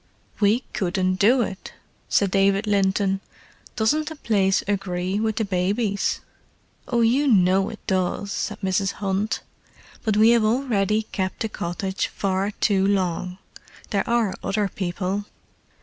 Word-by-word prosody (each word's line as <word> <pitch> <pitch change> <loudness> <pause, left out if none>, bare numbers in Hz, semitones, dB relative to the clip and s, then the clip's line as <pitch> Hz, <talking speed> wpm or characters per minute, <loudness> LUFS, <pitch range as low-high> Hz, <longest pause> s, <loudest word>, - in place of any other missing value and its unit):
"We 215 +4 +3
couldn't 185 0 0
do 240 +5 +5
it," 195 -2 -7 0.4
said 200 -2 +2
David 195 +2 +3
Linton. 195 -1 +1 0.5
"Doesn't 300 +7 +1
the 320 - -7
place 200 -8 +1
agree 190 -1 -1
with 220 -1 0
the 220 - 0
babies?" 200 +2 0 0.7
"Oh, 240 -2 +1
you 255 +6 +3
know 190 -4 +4
it 220 - -11
does," 190 +1 -1
said 210 0 -3
Mrs. 190 0 0
Hunt. 200 +2 -1 0.6
"But 215 -2 +1
we 220 +2 +6
have 235 -2 +4
already 215 -3 +1
kept 190 -3 -4
the 220 - -1
cottage 190 +1 -3
far 195 0 -1
too 200 -2 +1
long—there 185 +1 -3
are 235 -4 +2
other 205 0 0
people." 190 +2 -3
200 Hz, 135 wpm, -23 LUFS, 190-220 Hz, 0.7 s, we